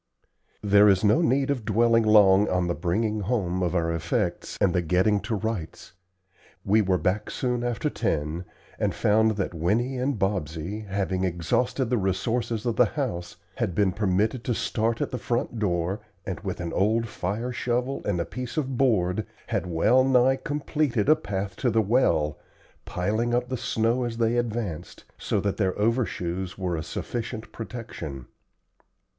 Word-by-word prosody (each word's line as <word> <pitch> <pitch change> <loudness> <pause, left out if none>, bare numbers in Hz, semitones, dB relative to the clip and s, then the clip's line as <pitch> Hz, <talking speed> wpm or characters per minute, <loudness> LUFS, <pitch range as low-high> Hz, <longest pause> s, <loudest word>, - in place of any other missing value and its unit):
There 100 0 +6
is 95 0 +3
no 105 +11 +4
need 140 -3 +2
of 130 -5 -2
dwelling 115 +2 +3
long 105 -2 +5
on 90 -1 +1
the 85 - 0
bringing 105 +6 -1
home 95 -4 -1
of 90 0 0
our 85 -1 +1
effects 85 - -2
and 95 -3 +3
the 90 - +2
getting 90 +5 +2
to 110 - -3
rights. 105 -8 -4 0.7
We 105 +3 +4
were 95 -2 +2
back 95 +4 -1
soon 125 -2 -1
after 120 +4 -1
ten, 80 - -2 0.3
and - - 0
found 110 0 +3
that 95 -3 -2
Winnie 115 +11 0
and 130 0 0
Bobsey, 95 +1 -2
having 95 -1 -1
exhausted 120 - 0
the 125 - +2
resources 110 +4 -1
of 115 -2 -1
the 125 - +6
house, 90 -12 -3 0.2
had 90 - -1
been 100 -1 +3
permitted 105 +5 0
to 120 - 0
start 115 +2 -1
at - - -1
the 125 - -3
front 120 0 -2
door, 90 -1 0 0.3
and, 95 - -4
with 95 -3 -5
an 85 -1 -4
old 110 +4 +2
fire 105 +4 -3
shovel 125 +2 -1
and 90 - -1
a 85 - -1
piece 125 +4 -6
of 135 -4 -1
board, 105 -6 +2 0.2
had - - -1
well 105 +10 +3
nigh 130 0 +4
completed 145 -5 -1
a 155 - +8
path 100 -9 -4
to 125 - +1
the 115 0 +2
well, 95 - +2 0.5
piling 110 +6 0
up 125 0 -1
the 130 - -1
snow 115 +1 0
as 115 -1 -4
they 115 0 +2
advanced, 110 -8 -3 0.2
so - - 0
that 100 -2 -1
their 95 -3 0
overshoes 95 -5 -1
were 90 -3 -2
a 80 - -3
sufficient 115 +5 -5
protection. 110 - -7
105 Hz, 170 wpm, -26 LUFS, 90-120 Hz, 0.7 s, a